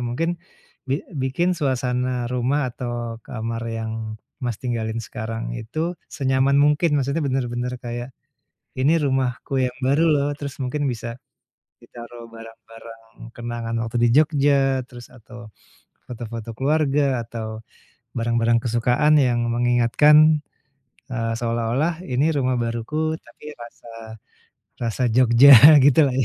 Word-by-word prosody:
mungkin 165 +7 -2 0.5
bi 135 +3 -2
bikin 140 +6 -1
suasana 125 -3 -1
rumah 130 +4 0
atau 120 -2 -5
kamar 115 0 -5
yang 115 -1 -4 0.5
Mas 120 -4 -2
tinggalin 115 -2 -3
sekarang 115 -2 -6
itu 155 +10 -3 0.2
senyaman 135 0 +1
mungkin, 150 +1 +2
maksudnya 140 +4 -1
bener-bener 125 -2 -2
kayak 120 +1 -5 0.7
ini 155 +5 +3
rumahku 135 -2 -2
yang 125 -1 -2
baru 140 +5 +2
loh, 140 -1 +1
terus 140 -2 -6
mungkin 145 +3 -3
bisa 115 0 -6 0.7
ditaruh 120 0 -12
barang-barang 115 0 -13 0.4
kenangan 120 -1 -5
waktu 115 +1 -4
di - - +4
Jogja, 140 -3 +2
terus 120 -2 -13
atau 120 -1 -13 0.6
foto-foto 115 -2 -7
keluarga, 140 -3 +1
atau 110 -1 -7 0.5
barang-barang 115 0 +1
kesukaan 125 +6 +2
yang 120 -2 +1
mengingatkan, 120 +5 +4 1.0
eee, 115 -2 -2
seolah-olah 120 +8 -1
ini 130 +4 +1
rumah 130 -1 0
baruku 120 +8 -2
tapi 150 +5 -12
rasa 120 0 -13 1.0
rasa 115 +2 -2
Jogja 125 +3 +7 0.3
gitulah 140 -1 +4
ya. 135 - +2
125 Hz, 115 wpm, -22 LUFS, 115-140 Hz, 1.0 s, Jogja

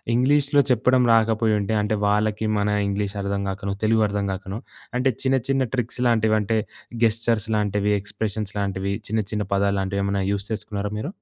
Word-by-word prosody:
ఇంగ్లీష్‌లో 140 +3 +3
చెప్పడం 125 +1 +3
రాకపోయుంటే, 110 -2 +2
అంటే 105 +1 0
వాళ్ళకి 105 +1 +1
మన 100 - +1 0.2
ఇంగ్లీష్ 100 0 -2
అర్థం 100 0 -2
గాకనొ 100 0 -3
తెలుగు 110 0 +3
అర్థం 100 0 -2
గాకనో 95 +3 -6 0.4
అంటే 130 +1 +2
చిన్న, 130 0 +3
చిన్న 135 -1 +2
ట్రిక్స్ 125 0 -3
లాంటివి 110 -2 +3
అంటే 110 +2 0 0.5
గెస్చర్స్ 115 -1 +1
లాంటివి 105 0 +1
ఎక్స్‌ప్రష‌న్స్ 105 0 -4
లాంటివి 100 0 -1 0.2
చిన్న, 110 +1 +1
చిన్న 105 -2 -1
పదాలు 100 0 +1
లాంటివి 100 +1 -2
ఏమైనా 100 -1 0
యూజ్ 100 0 -3
చేసుకున్నారా 105 -1 -3
మీరు? 145 +11 -4
105 Hz, 160 wpm, -23 LUFS, 100-115 Hz, 0.5 s, ఇంగ్లీష్‌లో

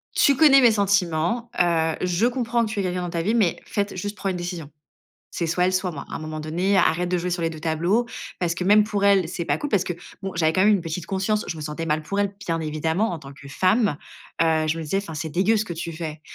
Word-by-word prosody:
tu 280 - +4
connais 275 -2 +7
mes 235 -2 +6
sentiments, 200 +2 +1
heu, 165 -2 +2
je 180 +4 +1
comprends 240 -2 0
que - - -5
tu 205 - -3
aies - - 0
quelqu'un 180 0 -2
dans 175 - -3
ta 170 -1 -2
vie, 215 +7 0
mais 200 -8 +2
faite 200 -1 -2
juste 205 +3 -5
prendre 195 - -2
une 180 - -3
décision. 175 -4 -5 0.6
C'est 170 - -2
soit 180 +2 +1
elle, 185 - +1
soit 185 0 0
moi. 145 -4 -7
À - - -4
un - - -4
moment 155 0 -6
donné, 175 +6 0
arrête 175 0 +2
de 180 - +1
jouer 180 +1 -2
sur 175 - -2
les 165 - +1
2 160 -1 -8
tableaux 170 +9 +1 0.3
parce 170 -2 0
que 180 - -4
même 210 +3 +6
pour 205 -2 -2
elle, 195 -4 +4
c'est 170 -1 -4
pas - - +1
cool». 295 - -4
Parce 200 -6 +2
que, 175 - -3 0.3
bon, 195 0 -4
j'avais 160 -1 +2
quand 185 - +2
même 205 - +5
une 195 - +1
petite 165 +1 -5
conscience, 200 +2 0
je 165 - -4
me 155 - -7
sentais 150 +2 -4
mal 155 0 0
pour 200 +6 -3
elle, 200 0 0
bien 165 -1 0
évidemment, 160 +7 -1
en 170 - -5
tant 140 -1 -11
que 140 - -13
femme, 185 - +2 0.4
heu, 160 -1 +2
je 160 +1 0
me 165 - -4
disais: 155 +6 -1
«Enfin, 195 -5 -4
c'est 160 +1 -4
dégueu 195 +8 +2
ce 215 - -1
que 170 - -5
tu 170 +1 -5
fais», 155 -1 -6
180 Hz, 280 wpm, -23 LUFS, 160-200 Hz, 0.6 s, connais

